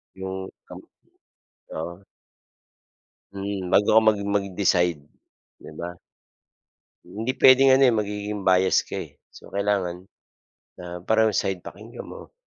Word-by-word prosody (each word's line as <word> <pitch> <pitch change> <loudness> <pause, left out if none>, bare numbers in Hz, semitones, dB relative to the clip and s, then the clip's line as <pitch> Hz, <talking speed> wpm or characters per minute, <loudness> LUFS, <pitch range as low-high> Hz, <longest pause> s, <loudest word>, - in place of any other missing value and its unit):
'Yung 95 0 -5 0.2
kam - - -10 1.0
oo. 85 +3 -5 1.3
Hmm, 100 -2 -4
bago 105 - +4
ka 110 - +8
mag 105 -1 +5 0.2
mag-decide 90 -5 +1 0.6
'di - - -12
ba. 90 +1 -6 1.1
Hindi 110 +8 -3
puwedeng 135 +1 +7
ano, 135 +1 +6
eh, 120 - +4
magiging 105 -1 -3
bias 95 0 +3
ka, - - -7
eh. - - -7 0.2
So - - -16
kailangan, 95 -3 -1 0.7
ah, 90 0 -7
parehong 110 -2 +2
side 95 -2 -1
pakinggan 110 +8 -10
mo. - - -11
100 Hz, 120 wpm, -24 LUFS, 90-105 Hz, 1.3 s, ka